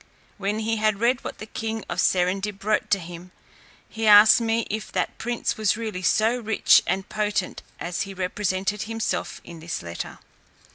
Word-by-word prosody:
When 205 +2 -1
he 220 +1 -1
had 215 -2 +1
read 245 +2 +1
what - - -6
the 215 - -8
king 220 0 -5
of - - -1
Serendib 195 +2 0
wrote 215 +1 0
to 200 - +4
him, 175 0 -9 0.6
he 225 0 -3
asked 210 +2 +8
me, 230 0 0
if 215 +1 -4
that - - -1
prince 240 -1 -2
were 215 +1 +1
really 215 -5 -4
so 220 +7 +2
rich 220 -2 +4
and 190 +1 -1
potent 210 -3 -2 0.2
as 175 0 -3
he 195 0 -5
represented 190 +2 -2
himself 225 +1 -3
in 170 -2 -11
his 165 - -5
letter? 85 0 -6
210 Hz, 175 wpm, -24 LUFS, 190-220 Hz, 0.6 s, asked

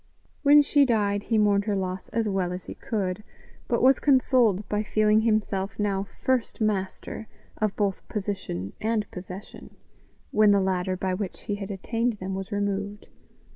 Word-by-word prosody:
When 290 0 +7
she 285 0 +4
died 205 -5 +1
he 225 - +3
mourned 205 -1 +3
her 210 -2 0
loss 185 +3 -3
as 225 -2 -1
well 190 -3 0
as 180 0 -6
he - - -7
could, 205 -2 -3 0.4
but 235 - +1
was 265 +1 +6
consoled 250 -7 +3
by 210 0 0
feeling 215 0 +3
himself 210 -3 0
now 200 -2 0 0.2
first 260 -3 0
master 210 0 -2 0.3
of 215 -2 0
both 200 -3 0
position 185 - -4
and 220 -1 0
possession, 185 +2 -9 0.6
when 215 -1 +5
the 200 -1 +5
ladder 185 -1 0
by 185 0 -1
which 190 0 -4
he 205 - -3
had 200 -1 -5
attained 225 +5 -1
them 190 -2 -5
was 195 0 -5
removed. 205 0 -3
205 Hz, 165 wpm, -26 LUFS, 190-220 Hz, 0.6 s, When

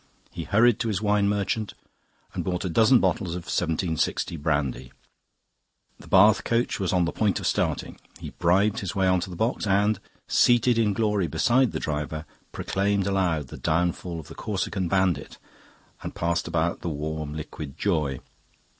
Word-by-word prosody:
He 85 - -6
hurried 110 +2 +4
to 115 - -1
his 105 -4 -1
wine 105 -1 +2
merchant 105 +1 -2 0.6
and - - -3
bought 90 0 -2
a - - -1
dozen 115 +8 +5
bottles 90 -7 0
of 90 - -5
1760 80 -1 -1
brandy. 70 -5 -2 1.1
The - - -14
Bath 100 +2 +5
coach 115 0 0
was 95 -3 0
on 90 -2 +2
the 85 - -2
point 105 -4 0
of - - -6
starting; - - -1 0.2
he - - -7
bribed 100 +5 +2
his 95 - -5
way 95 -1 +2
on 95 0 +3
to 90 - -5
the 90 - -7
box 110 +3 -1
and, 100 +1 +2 0.3
seated 120 -1 +4
in 105 -3 +2
glory 105 -3 0
beside 120 +11 +2
the - - -3
driver, 75 +1 -3 0.3
proclaimed 100 0 -1
aloud 90 -8 0
the - - -9
downfall 85 +1 -1
of 80 - -10
the - - -10
Corsican 95 -2 -2
bandit 95 -1 0 0.6
and - - -7
passed 85 0 -1
about 85 0 -1
the 85 - -3
warm 75 0 -4
liquid 75 -2 -7
joy. 75 -9 -1
95 Hz, 170 wpm, -25 LUFS, 80-105 Hz, 1.1 s, dozen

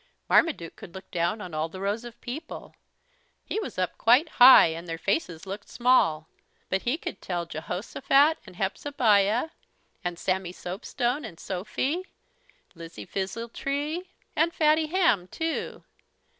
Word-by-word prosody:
Marmaduke 175 - +2
could 170 - -12
look 190 - -10
down 175 +5 -1
on 180 -5 -8
all 155 +1 -1
the 185 - -9
rows 200 +4 -2
of 240 -1 -11
people. 295 +6 -7 0.7
He - - -2
was 430 - -6
up 185 -1 -2
quite 250 +8 +5
high 260 +2 +11
and 165 +2 -6
their 165 0 -4
faces 165 - -2
looked 200 +2 -7
small, 165 -11 +3 0.4
but 190 - 0
he 250 +5 0
could 195 - -7
tell 175 -2 -3
Jehosophat, 230 - +1
and 185 - -12
Hepzebiah, 215 - +2 0.5
and 175 -1 -3
Sammy 185 -1 -1
Soapstone, 240 +10 -3
and 165 - -9
Sophy, 260 - -3 0.7
Lizzie 165 - -10
Fizzletree, 275 - -3 0.3
and 335 +1 +2
Fatty 310 -1 +3
Hamm, 315 - +2
too. 325 - -4
205 Hz, 140 wpm, -27 LUFS, 180-285 Hz, 0.7 s, high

